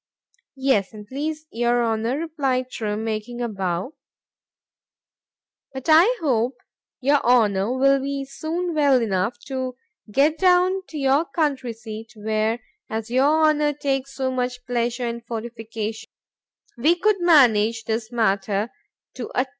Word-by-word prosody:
——Yes, 260 -7 +1
an' 210 -1 -9
please 305 +6 -4
your 240 +1 +1
Honour, 225 +3 0
replied 275 -6 -1
Trim, 215 -1 -3
making 225 +2 -4
a 240 - -1
bow; 190 - -3 1.8
but 265 -1 -7
I 355 +11 +6
hope 250 -4 +1 0.4
your 280 +2 +3
Honour 225 -1 +3
will 275 +1 +4
be 275 0 -3
soon 330 +5 -3
well 285 -4 +4
enough 210 +1 -1
to 260 -2 -4 0.3
get 290 +8 +2
down 370 +1 +4
to 310 - -8
your 275 +3 +2
country 275 -8 -1
seat, 220 0 -9
where,—as 220 +1 -3
your 290 +5 +3
Honour 300 -1 +2
takes 275 -2 -2
so 260 -1 -1
much 250 -1 -3
pleasure 240 0 -1
in 235 0 -4
fortification, 225 -1 -6 0.7
we 315 +8 +4
could 400 +2 +1
manage 230 -9 +4
this 225 +1 -3
matter 205 -1 0 0.4
to 245 - -6
a 255 - +2
T. - - -25
250 Hz, 135 wpm, -23 LUFS, 225-285 Hz, 1.8 s, I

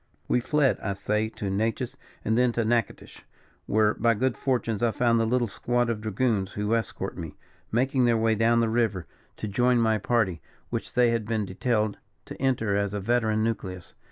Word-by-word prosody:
We - - +2
fled, 140 +2 +2
I 100 - -2
say, 105 +2 -1
to 100 -3 -4
Natchez, 110 +3 -1 0.3
and 110 - +2
thence 125 0 +2
to 115 - +1
Natchitoches, 115 -1 -2 0.5
where 105 0 +3
by 115 0 +2
good 130 +2 0
fortune 115 -3 -1
I 120 - +3
found 115 0 +2
the 115 - +1
little 120 0 +1
squad 120 +2 0
of 110 -2 -4
dragoons 110 -2 0
who 105 +2 -1
escort 115 -1 -2
me, 80 -3 -7 0.4
making 130 +2 +2
their 120 -1 +3
way 110 0 +2
down 115 +2 +3
the 115 - +2
river 110 -6 0 0.3
to 110 - -4
join 120 +5 +2
my 110 -2 +2
party, 100 -6 0 0.3
which - - -4
they 125 -1 +4
had 115 -2 -1
been 110 -2 0
detailed 105 +2 -1 0.3
to - - -10
enter 115 -6 +1
as 100 0 -1
a - - -1
veteran 110 0 +1
nucleus. 95 -6 -4
115 Hz, 190 wpm, -26 LUFS, 105-120 Hz, 0.5 s, they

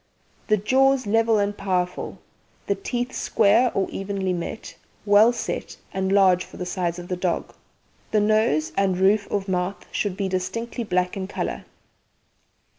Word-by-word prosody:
The 215 - +3
jaws 260 +5 +3
level 225 +1 +3
and 205 0 0
powerful, 180 -2 -2 0.5
and - - -2
teeth 245 -5 -2
square 225 +4 +3
or 195 - +1
evenly 195 -1 -2
met, 175 +5 -6 0.3
well 205 +3 +6
set, 240 - -5 0.2
and 190 0 -1
large 190 -2 +4
for - - -13
the 180 - -4
size 175 -2 -2
of 175 0 -8
the 180 - -2
dog. 180 -1 -2 0.6
The 215 - +2
nose 210 -7 +2
and 195 -2 +1
roof 200 +2 +3
of 200 -1 -2
mouth 180 +1 -2
should 200 -3 -2
be 200 -1 -1
distinctly 230 +6 -3
black 180 -3 0
in 190 -1 -4
colour. - - -4
195 Hz, 155 wpm, -24 LUFS, 185-215 Hz, 0.6 s, well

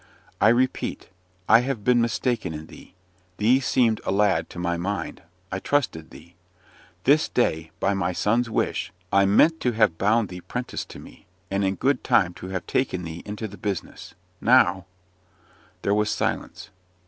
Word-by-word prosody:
"I - - +6
repeat, 125 +3 0 0.4
I 115 - +7
have 125 -3 -3
been 125 0 +4
mistaken 115 - -1
in 75 +1 -7
thee! 90 - -15 0.4
Thee 120 +5 +4
seemed 120 -4 +1
a - - -1
lad 95 -5 +2
to - - -12
my 85 0 -1
mind; 90 0 -4 0.3
I 95 - -2
trusted 95 - -1
thee. 80 +6 -15 0.7
This 145 +6 +4
day, 80 -9 0
by 100 - +1
my 95 -2 -1
son's 115 +6 +1
wish, 115 - -1 0.2
I 100 0 +5
meant 155 +12 +4
to 125 - 0
have 110 -7 +2
bound 105 +1 +2
thee 90 0 -8
'prentice 125 +5 -5
to - - -12
me, - - -14 0.2
and 100 +1 0
in 95 0 0
good 135 +3 0
time 90 -5 +3
to 90 - -6
have 95 -2 -4
taken 95 -9 -1
thee 85 0 -7
into 105 +2 -5
the 100 -2 -12
business. 95 -4 -5 0.3
Now 95 0 +4 0.5
" - - -32
There 100 - +2
was 105 0 +1
silence. - - -3
100 Hz, 170 wpm, -24 LUFS, 90-120 Hz, 0.7 s, I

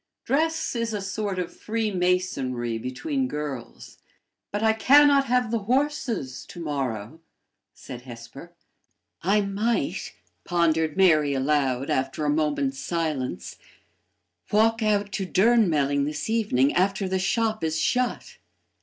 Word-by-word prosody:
Dress 320 +1 0
is 230 -1 -1
a - - -2
sort 195 0 -3
of 180 -1 -4
freemasonry 180 - -1
between 260 - -2
girls. 150 - -7 0.5
"But 205 +2 -2
I 220 0 +4
can 285 +6 +6
not 280 -1 +4
have 250 -3 +1
the 230 - +1
horses 240 - -1
to - - -10
morrow," 135 -4 -4 0.6
said 125 - -9
Hesper. 125 +6 -11 0.7
"I 200 +4 +3
might," 205 +4 -1 0.3
pondered 160 -2 +1
Mary 155 -7 +4
aloud, 135 -1 0
after 135 +3 -1
a 145 - +2
moment's 145 -3 0
silence, 145 - -3 0.9
"walk 225 +2 +3
out 205 -2 +1
to 195 0 -2
Durnmelling 170 -11 +3
this 150 +7 -3
evening 175 - +2
after 195 +2 +1
the 190 0 -1
shop 215 +2 0
is 160 0 0
shut. 250 +9 -1
180 Hz, 125 wpm, -25 LUFS, 140-220 Hz, 0.9 s, can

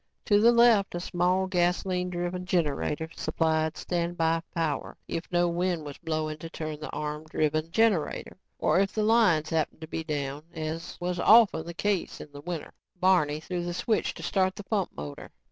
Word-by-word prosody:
To 205 -2 +4
the 235 +2 +7
left, 235 -5 +5
a - - -2
small, 180 +2 +1
gasoline 180 0 0
driven 175 +1 -3
generator 155 - 0
supplied 160 -1 0
standby 170 -2 0
power 160 -3 -2
if 165 - -5
no 175 0 +3
wind 175 -2 -1
was 145 -1 -8
blowing 155 -2 -2
to 165 - -7
turn 155 -2 -5
the 155 - -6
arm 150 +1 -4
driven 155 0 0
generator 205 -4 +1 0.2
or 155 - +2
if 195 0 +1
the 215 - 0
lines 210 -9 +3
happened 160 -1 -1
to 160 - -6
be 160 0 -4
down, 145 -2 -3
as 160 +1 -5
was 180 0 -2
often 205 -6 +6
the 170 - -6
case 200 -1 -1
in 150 - -10
the 145 0 -10
winter. 170 -1 -5 0.3
Barney 175 -5 +3
threw 175 +2 -4
the 175 0 -3
switch 220 +3 0
to - - -9
start 190 -1 +1
the 205 - -7
pump 195 -2 -1
motor. 75 0 -7
170 Hz, 180 wpm, -28 LUFS, 155-185 Hz, 0.3 s, the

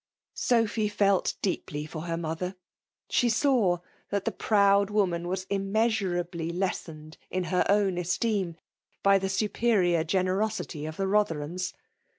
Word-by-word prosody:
Sophy 225 -3 +1
felt 200 -2 +2
deepl 190 - -1
J 150 +1 -3
for 155 0 -7
lier 165 0 -1
mother. 170 +3 -3 0.5
She 245 - +2
saw 225 -6 +3 0.4
^^ 200 -1 +1
the - - -1
proud 200 -1 +3
woman 180 -5 0
ivas 185 +1 -2
immeasurablj 195 -5 0
les 190 0 +2
sened 155 -1 -11
in 185 0 -2
h«r 180 +1 +2
own 200 -3 +3
esteem 180 -1 -1 0.5
1>y 195 -1 +5
the 195 - -1
superior 190 -4 +2
gene 185 +3 +1
rosity 185 -5 -2
of 155 - -9
the 195 - -1
Botherliams. 185 -3 0
190 Hz, 145 wpm, -28 LUFS, 175-205 Hz, 0.5 s, 1>y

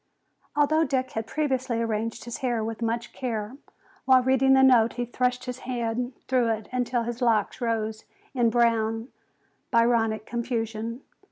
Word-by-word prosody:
Although 310 +2 +3
Dick 260 -2 -1
had 225 0 -4
previously 260 -5 -1
arranged 225 0 -2
his 240 - -5
hair 240 -4 -1
with 225 +1 -5
much 230 +1 -2
care, 230 -1 -4 0.5
while 260 -1 +6
reading 265 +1 +4
the 265 0 +6
note 240 -4 +5
he 245 0 -2
thrust 250 +1 -1
his 250 0 -5
hand 245 0 -3
through 255 -2 +2
it 220 -2 -2
until 245 -1 0
his 240 +1 -5
locks 230 0 +1
rose 220 -2 -2 0.3
in 240 -3 +3
brown, 225 0 +1 0.6
Byronic 230 -3 +2
confusion. 230 0 -3
235 Hz, 150 wpm, -26 LUFS, 225-255 Hz, 0.6 s, while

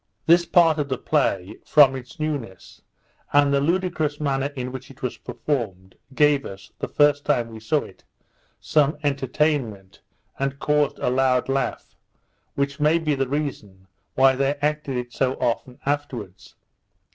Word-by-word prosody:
This 170 +1 +5
part 165 -3 +4
of 145 -1 -2
the 130 - -1
play, 100 -13 0
from 140 -3 +5
its 125 +3 -10
newness, 140 -12 -5 0.5
and 145 0 +4
the 140 - +3
ludicrous 165 -2 0
manner 140 -2 0
in 125 -1 -4
which 130 0 -8
it 135 -1 -16
was 125 - -2
performed, 100 -10 -4 0.2
gave 145 -1 +4
us, 95 0 -10
the - - -3
first 145 -1 +3
time 120 -5 0
we 110 -1 -9
saw 140 +7 0
it, - - -15 0.6
some 150 -1 +2
entertainment, 135 -7 -1 0.4
and 135 0 -1
caused 150 0 +1
a - - -1
loud 130 0 +2
laugh, 135 0 -2 0.6
which 140 +1 -2
might 160 +2 +2
be 150 - +2
the 135 -2 -1
reason 125 -10 -4 0.3
why 135 0 +5
they 140 +2 +1
acted 145 -2 -2
it 120 0 -5
so 130 -1 0
often 125 +1 -2
afterwards. 120 -10 -4
140 Hz, 155 wpm, -23 LUFS, 125-150 Hz, 0.6 s, This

